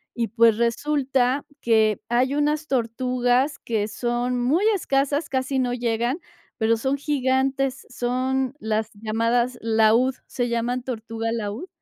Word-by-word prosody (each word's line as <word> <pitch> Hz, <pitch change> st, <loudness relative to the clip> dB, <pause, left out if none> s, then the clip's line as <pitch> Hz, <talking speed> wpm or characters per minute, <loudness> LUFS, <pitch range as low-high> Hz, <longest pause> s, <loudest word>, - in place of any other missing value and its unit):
y 230 Hz, -3 st, -1 dB
pues 230 Hz, 0 st, +4 dB
resulta 265 Hz, +2 st, +1 dB, 0.2 s
que 220 Hz, -2 st, +3 dB
hay 250 Hz, +3 st, +2 dB
unas 300 Hz, +1 st, 0 dB
tortugas, 250 Hz, +2 st, 0 dB
que 215 Hz, -3 st, -1 dB
son 245 Hz, +2 st, -1 dB
muy 310 Hz, +11 st, +2 dB
escasas, 285 Hz, -2 st, 0 dB
casi 265 Hz, 0 st, -1 dB
no 250 Hz, -1 st, 0 dB
llegan, 240 Hz, +4 st, -1 dB, 0.4 s
pero 225 Hz, 0 st, +2 dB
son 265 Hz, +4 st, -1 dB
gigantes, 270 Hz, -1 st, 0 dB
son 255 Hz, +2 st, -1 dB
las 220 Hz, -1 st, -1 dB
llamadas 230 Hz, +3 st, 0 dB
laúd, 225 Hz, +3 st, +3 dB
se 245 Hz, -1 st, -2 dB
llaman 240 Hz, +2 st, -1 dB
tortuga 225 Hz, -2 st, -4 dB
laúd. 225 Hz, -, -4 dB
245 Hz, 125 wpm, -24 LUFS, 230-265 Hz, 0.4 s, pues